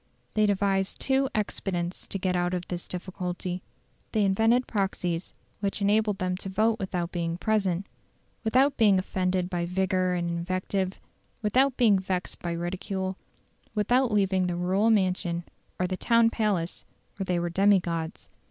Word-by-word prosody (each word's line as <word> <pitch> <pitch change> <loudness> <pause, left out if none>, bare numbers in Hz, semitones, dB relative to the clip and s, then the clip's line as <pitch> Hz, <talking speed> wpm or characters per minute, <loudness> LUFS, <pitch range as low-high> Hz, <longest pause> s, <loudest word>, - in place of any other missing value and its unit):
They 215 -1 +3
devised 195 -1 +1
two 270 0 +2
expedients 185 -4 -2
to - - -3
get 185 -1 0
out 175 +1 +1
of 180 0 -4
this 175 -1 -5
difficulty: 180 0 -4 0.5
they 215 -2 +3
invented 225 +6 +3
proxies 185 -4 -2 0.2
which 200 -1 -1
enabled 210 0 +2
them 185 -1 -1
to 195 - -6
vote 220 +4 +2
without 180 -3 -2
being 170 -1 -2
present, 195 -3 0 0.6
without 260 +5 +3
being 210 -4 +5
offended 185 -1 0
by 175 -2 -2
vigour 185 0 +1
and 175 -1 -1
invective, 185 +2 -2 0.4
without 260 +5 +3
being 215 -6 +5
vexed 185 -1 -3
by 170 -1 -2
ridicule, 185 +2 -3 0.6
without 245 +4 +2
leaving 190 -3 +2
the 175 - -1
rural 185 +5 +2
mansion 185 -4 +1 0.4
or 180 - +2
the 185 0 -2
town 230 +1 +4
palace 200 -7 -1 0.3
where 195 - -2
they 180 -1 0
were 175 0 -1
demigods. 175 -3 +1
190 Hz, 150 wpm, -27 LUFS, 180-210 Hz, 0.6 s, being